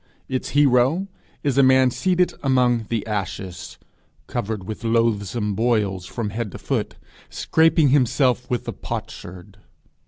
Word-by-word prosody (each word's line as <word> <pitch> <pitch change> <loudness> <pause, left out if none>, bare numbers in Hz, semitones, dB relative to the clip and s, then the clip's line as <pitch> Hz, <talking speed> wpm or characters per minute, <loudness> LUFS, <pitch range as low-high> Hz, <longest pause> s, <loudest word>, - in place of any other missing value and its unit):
Its 130 -1 -3
hero 140 +6 +3 0.4
is 140 -2 +1
a - - +8
man 130 -1 +5
seated 180 +4 +1
among 125 -4 +2
the 115 -3 -2
ashes, 95 -4 -5 0.5
covered 105 -2 -3
with 110 +4 -7
loathsome 115 -2 0
boils 105 -5 0
from 110 -4 -4
head 110 -1 -4
to - - -8
foot, - - -3 0.3
scraping 160 -2 +3
himself 130 -2 +2
with 125 -2 -2
a - - -3
potsherd. 95 +3 -8
120 Hz, 130 wpm, -22 LUFS, 105-130 Hz, 0.5 s, a